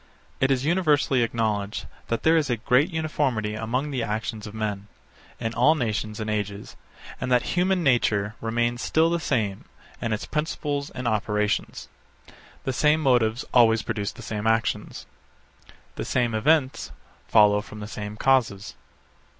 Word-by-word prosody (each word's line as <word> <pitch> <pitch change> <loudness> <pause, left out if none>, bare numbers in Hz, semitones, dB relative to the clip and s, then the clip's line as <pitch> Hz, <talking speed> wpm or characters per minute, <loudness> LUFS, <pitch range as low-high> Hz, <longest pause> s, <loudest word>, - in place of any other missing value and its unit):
It 135 - +2
is 135 0 +1
universally 150 -6 +2
acknowledged 110 -2 -1 0.2
that 115 - -2
there 160 +1 +5
is 155 -4 +2
a 120 - +1
great 125 - +2
uniformity 145 -9 -1
among 120 +7 -2
the 130 -3 -2
actions 110 0 -3
of 105 - -10
men, 105 -2 -3 0.5
in 115 0 -3
all 125 +8 +4
nations 110 -4 -2
and 110 - -3
ages, 105 -1 -3 0.5
and 125 - -2
that 125 -1 +2
human 180 0 +2
nature 110 -6 +2
remains 120 +2 -1
still 160 +1 +2
the 170 - +1
same, 110 -10 -1 0.4
in 115 - -2
its 110 - -2
principles 150 -2 -2
and 125 -1 -5
operations. 105 -1 -1 0.8
The 130 - -2
same 150 +4 +3
motives 120 -5 +2
always 115 -2 +5
produce 100 -1 -3
the - - -12
same 105 0 -3
actions. 110 0 -1 0.9
The - - -3
same 120 -3 0
events 130 - +1 0.4
follow 105 -2 +5
from 105 +1 -11
the 105 - -6
same 105 0 -6
causes. 120 -7 +1
115 Hz, 150 wpm, -25 LUFS, 105-135 Hz, 0.9 s, there